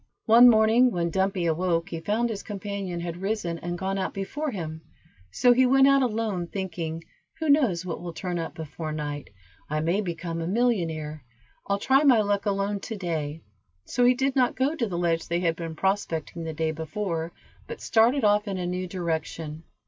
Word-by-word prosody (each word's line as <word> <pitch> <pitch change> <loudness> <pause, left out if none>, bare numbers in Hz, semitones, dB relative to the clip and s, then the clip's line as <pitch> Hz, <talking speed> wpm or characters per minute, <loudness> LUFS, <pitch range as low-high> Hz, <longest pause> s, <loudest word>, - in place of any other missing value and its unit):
One 235 +2 +8
morning 225 +2 +5
when 170 -6 -1
Dumpy 190 -1 0
awoke 170 +1 0
he 165 - -4
found 220 +7 0
his 200 -2 -4
companion 200 -3 -5
had 170 +1 -5
risen 195 -5 -2
and 175 0 -4
gone 195 +1 -2
out 190 - -3
before 295 +11 -3
him, 160 - -5 0.5
so 245 - +4
he 255 +1 +4
went 270 +1 +6
out 275 0 +5
alone, 215 -7 -1
thinking, 170 -4 -4 0.3
"who 320 -1 -2
knows 235 - +3
what 170 - -4
will 175 -1 -5
turn 175 +1 -4
up 165 - -5
before 155 0 -6
night, 145 -2 -4 0.4
I 155 +1 0
may 170 +6 +1
become 170 -2 -4
a 165 - -3
millionaire. 165 - 0 0.4
I'll 200 - +1
try 270 +7 +3
my 255 -6 +6
luck 205 0 0
alone 200 0 0
to 220 +3 -6
day;" 160 -5 -3 0.4
so 245 - 0
he 250 +1 +5
did 270 +1 0
not 250 -2 +2
go 270 +4 +1
to 250 -8 -1
the 175 -4 -4
ledge 170 -1 0
they 170 +1 0
had 165 -2 +1
been 165 -1 -6
prospecting 170 -3 -2
the 160 - -4
day 160 0 -1
before, 165 +1 -3 0.4
but - - -7
started 235 +4 +3
off 210 0 +3
in 195 -2 -2
a 180 - -3
new 180 +1 -2
direction. 160 -3 -4
185 Hz, 195 wpm, -26 LUFS, 165-220 Hz, 0.5 s, One